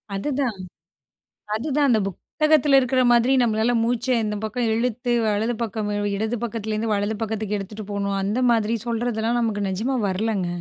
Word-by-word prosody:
அதுதான். 255 0 -1 1.0
அதுதான், 285 +5 +1
அந்த 225 -3 +4
புத்தகத்தில 300 - +2
இருக்கிற 255 0 +1
மாதிரி 240 +2 +4
நம்மளால 225 0 +2
மூச்சை 245 +2 0
இந்த 210 -1 -2
பக்கம் 230 +1 -1
இழுத்து, 245 +1 -1 0.2
வலது 215 +3 0
பக்கம் 215 -1 -3
வி 205 - 0
இடது 220 +3 -1
பக்கத்துலேருந்து 220 -1 -2
வலது 205 +2 -1
பக்கத்துக்கு 215 -1 -2
எடுத்துட்டு 205 +2 -7
போணும், 200 -1 -1
அந்த 205 +5 0
மாதிரி 225 -1 +1
சொல்றதெல்லாம் 235 0 0
நமக்கு 215 -3 -1
நெஜமா 220 +8 -1
வரலங்க. 195 -1 -1
225 Hz, 145 wpm, -23 LUFS, 210-245 Hz, 1.0 s, அந்த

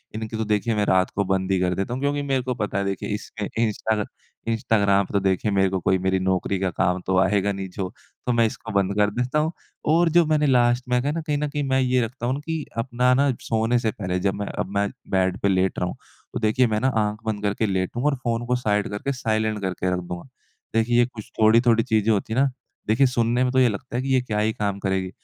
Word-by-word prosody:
इनकी 110 0 -4
तो 110 - -1
देखिए 105 +2 0
मैं 105 -1 +1
रात 95 -1 +3
को 100 - +1
बंद 95 0 0
ही 95 - +2
कर 90 0 +1
देता 95 +6 -2
हूँ। 130 - -4
क्योंकि 145 0 0
मेरे 135 -2 0
को 125 0 -1
पता 105 -4 -2
है 100 - 0
देखिए 100 -1 -3
इसमें 105 -1 -6 0.2
इंस्टाग 110 -1 0 0.4
इंस्टाग्राम 100 -3 +2
तो 100 - +3
देखिए 95 +2 0
मेरे 95 -1 +3
को 95 0 -1
कोई 95 +1 +2
मेरी 95 +1 0
नौकरी 95 +1 0
का 95 0 0
काम 90 0 0
तो 95 0 +2
आएगा 100 +1 +2
नहीं 95 -1 -4
जो 95 0 -4 0.4
तो 125 - +1
मैं 115 -1 +4
इसको 110 +1 -7
बंद 100 -1 +1
कर 105 0 +3
देता 125 +7 0
हूँ 155 +1 0 0.4
और 170 +1 +4
जो 170 +1 +4
मैंने 155 -1 +2
लास्ट 120 -1 +3
में 125 0 +2
कहा 140 +3 -1
ना 165 +2 -2
कहीं 150 -2 -1
न 150 +1 -1
कहीं 145 0 -2
मैं 130 0 +3
ये 130 -1 +2
रखता 120 +2 -7
हूँ 125 +2 +1
न - - -6
कि 160 -3 -3
अपना 125 +1 +2
ना 140 +2 +3
सोने 115 +2 +1
से 110 -2 0
पहले 90 -3 -3
जब 95 +1 0
मैं 100 0 -4
अब - - -3
मैं 100 0 +1 0.2
बेड 95 -1 +1
पे - - +2
लेट 95 0 +1
रहा 90 - 0
हूँ, - - -5 0.4
तो - - -2
देखिए 115 +3 +2
मैं 110 -1 0
ना 130 - +2
आँख 105 0 0
बंद 110 -2 -2
करके 105 +2 0
लेटूँगा 100 +7 -1
और 145 - 0
फ़ोन 115 0 -1
को 125 - +2
साइड 105 -4 0
करके 105 +7 -3
साइलेंट 110 -4 -1
करके 95 -1 -1
रख 90 - -1
दूँगा। 90 +2 -7 0.5
देखिए 120 +2 +3
कुछ 120 -4 -10
थोड़ी-थोड़ी 115 +1 +5
चीज़ें 110 0 +2
होती 105 +1 0
हैं 125 - +1
ना, 140 - +3 0.4
देखिए 120 +6 +4
सुनने 120 0 +1
में 125 - +1
तो 130 - +4
ये 125 -2 +5
लगता 120 +4 -6
है 125 - 0
कि 135 - -4
ये 130 - +4
क्या 105 -4 -2
ही 110 +1 +1
काम 100 -2 -2
करेगी? 95 -1 -1
110 Hz, 255 wpm, -23 LUFS, 100-125 Hz, 0.5 s, थोड़ी-थोड़ी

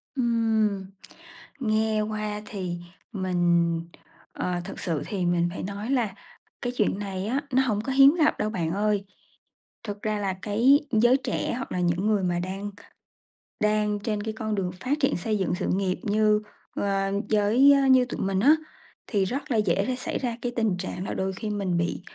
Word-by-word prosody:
Ừm, 225 -5 +1 0.7
nghe 220 -3 +1
qua 210 -1 -3
thì 185 -5 -4 0.4
mình, 175 -3 +1 0.5
ờ, 180 -1 -2
thực - - -7
sự 160 -4 -2
thì 190 -4 -2
mình 175 0 +2
phải 185 - -6
nói 200 +4 -5
là 235 -7 0 0.5
cái 245 -1 -2
chuyện 205 -2 +1
này 195 -1 -4
á 265 +5 0
nó 260 - +5
hổng 215 -5 0
có 265 - -3
hiếm 275 +3 +7
gặp 315 -3 +3
đâu 210 - 0
bạn 170 -6 -2
ơi, 205 +1 0 0.8
thực 205 -2 -6
ra 215 -1 -1
là 195 -2 -1
cái 235 +7 +4
giới 240 +3 +5
trẻ 270 - -2
hoặc 255 - -6
là 180 - -1
những 175 +3 +1
người 210 -3 +2
mà 175 -1 0
đang 195 +3 -4 0.9
đang 210 -1 +1
trên 210 0 -2
cái 220 0 -3
con 215 -1 -2
đường 185 -3 -1
phát 285 +4 0
triển 270 - +2
xây 215 +4 -1
dựng 185 -2 0
sự 185 - -3
nghiệp 190 -1 -1
như, 210 -1 +3 0.3
ơ, 195 -1 0 0.2
với 210 +2 +2 0.3
như 255 -1 +6
tụi 245 - -5
mình 195 0 0
á, 285 +9 +6 0.5
thì 200 -4 +1
rất 270 +7 -4
là 230 - +2
dễ 200 -2 +2
để 255 - 0
xảy 250 - -3
ra 240 -3 -2
cái 245 - -1
tình 220 -6 +1
trạng 185 0 -5
là - - -3
đôi 190 0 -2
khi 215 +3 -5
mình 195 -4 -1
bị 170 +1 -1
210 Hz, 190 wpm, -26 LUFS, 190-225 Hz, 0.9 s, hiếm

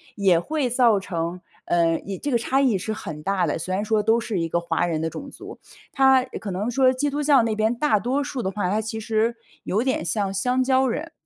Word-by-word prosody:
也 190 -4 +3
会 295 - -1
造 235 -4 +3
成， 170 -1 -4 0.2
呃， 165 -1 +2
异 195 -1 -6
这 290 +6 -4
个 240 - +3
差 265 +4 +1
异 240 -8 +3
是 215 +4 -4
很 160 -8 -7
大 195 0 +1
的， - - -2
虽 185 +3 -3
然 205 - -1
说 215 0 +1
都 225 +2 +3
是 215 -6 -3
一 165 - -1
个 170 +1 0
华 170 0 0
人 165 -3 -2
的 160 - -1
种 275 - -8
族。 - - -11 0.3
它 265 -1 +4
可 220 -5 -7
能 205 +6 -2
说 260 +1 +3
基 285 +3 -1
督 290 +1 -2
教 280 -5 +4
那 225 -1 0
边 220 +2 +1
大 235 -5 +2
多 265 +6 -1
数 270 -2 -4
的 190 - -2
话， 195 -2 -2
它 210 +3 +1
其 220 0 -4
实 225 +1 0 0.3
有 215 +5 0
点 260 -10 -1
像 195 +2 -1
香 250 +6 +1
蕉 260 0 +2
人， 310 +7 -3
220 Hz, 260 characters per minute, -23 LUFS, 185-255 Hz, 0.3 s, 它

